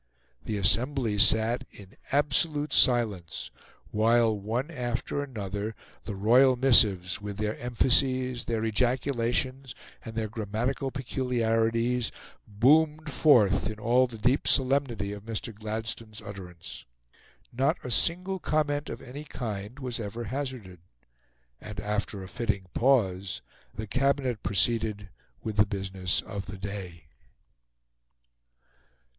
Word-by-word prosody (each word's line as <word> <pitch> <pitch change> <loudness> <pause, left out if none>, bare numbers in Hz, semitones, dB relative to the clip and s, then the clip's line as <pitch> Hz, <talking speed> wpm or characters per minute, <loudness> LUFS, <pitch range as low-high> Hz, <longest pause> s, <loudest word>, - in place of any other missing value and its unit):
The 110 - -2
assembly 115 +2 +1
sat 110 +3 +4
in 100 -1 -14 0.2
absolute 145 +2 +1
silence 110 -9 +2 0.4
while, 115 +1 +3
one 115 +9 -3
after 125 0 -2
another, 105 -5 -4 0.3
the 105 - -4
royal 125 +6 +5
missives, 100 -9 +5
with 100 -1 -6
their 105 0 -1
emphases, 125 +1 +1
their 115 -1 -1
ejaculations, 125 +3 -1 0.3
and 115 -1 -8
their 110 -1 -1
grammatical 115 +5 -2
peculiarities, 120 -2 0 0.4
boomed 150 +7 +3
forth 105 -10 +4
in 110 - -6
all 120 +4 +3
the 115 -2 -9
deep 125 +7 +1
solemnity 130 -7 +2
of 105 - -8
Mr. 115 +1 -5
Gladstone's 110 0 -5
utterance. 90 -4 -9 0.7
Not 130 +3 +1
a 125 - -5
single 180 +9 0
comment, 150 -2 0
of - - -7
any 135 +4 -8
kind, 110 -4 -6
was 125 -4 -4
ever 115 +2 -5
hazarded; 125 -7 -5 0.8
and, 105 -1 -7
after 105 -1 -3
a - - -8
fitting 100 -2 -2
pause, 100 -7 +1 0.3
the 110 - -4
Cabinet 130 0 0
proceeded 105 -1 0 0.3
with 110 -1 -4
the 105 - +6
business 95 -3 -1
of 100 -2 -6
the 100 - -7
day. 95 -4 -7
115 Hz, 115 wpm, -28 LUFS, 105-130 Hz, 0.8 s, the